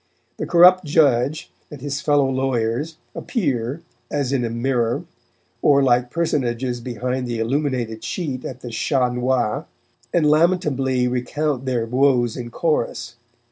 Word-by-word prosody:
The - - -4
corrupt 180 +2 +6
judge 145 -2 +2 0.2
and 150 - -9
his 140 +1 -4
fellow 145 -2 +3
lawyers 130 +3 -1 0.2
appear, 140 - -2 0.3
as 140 -2 -1
in 130 -3 +1
a 115 - -1
mirror, 120 0 0 0.6
or 140 -1 +4
like 125 -1 +2
personages 125 -6 -1
behind 125 +2 -3
the 120 -1 -3
illuminated 120 -2 -1
sheet 130 0 -4
at 130 -1 -7
the 120 - -7
"Chat 125 +2 0
Noir," 125 -3 0 0.4
and 170 -3 +2
lamentably 150 -6 +2
recount 130 +2 -2
their 120 -3 0
woes 125 -1 +2
in 120 -2 -6
chorus. 150 -3 -2
130 Hz, 135 wpm, -21 LUFS, 120-145 Hz, 0.6 s, corrupt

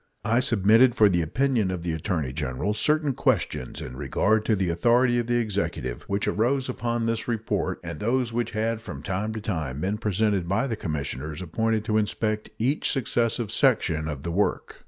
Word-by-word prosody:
I 115 +3 +3
submitted 120 0 +4
for 105 -4 +6
the 85 -2 +2
opinion 120 - +1
of 90 -2 -4
the 85 -2 -1
Attorney 80 -5 -2
General 75 +7 -2
certain 150 +5 +2
questions 120 - -1
in 65 - -7
regard 110 +10 +1
to 110 - +3
the 95 -3 0
authority 120 +7 +3
of 120 - -2
the 120 - +1
Executive 85 - -2
which 100 0 -1
arose 130 +5 +1
upon 120 -2 -2
this 115 0 -1
report 115 -2 -1
and 85 -2 -6
those 120 +1 0
which 120 0 -1
had 110 +1 0
from - - -8
time 100 +2 -2
to 110 - -5
time 80 -10 -3
been 100 +4 -1
presented 105 -3 0
by 100 +8 +1
the 120 -5 -2
commissioners 75 - -4
appointed 110 +5 -1
to 110 -1 +2
inspect 105 0 -1
each 130 +7 0
successive 120 -3 0
section 80 -1 +2
of 75 -3 -5
the 85 - -3
work. 100 +4 -1
105 Hz, 185 wpm, -25 LUFS, 85-115 Hz, -, for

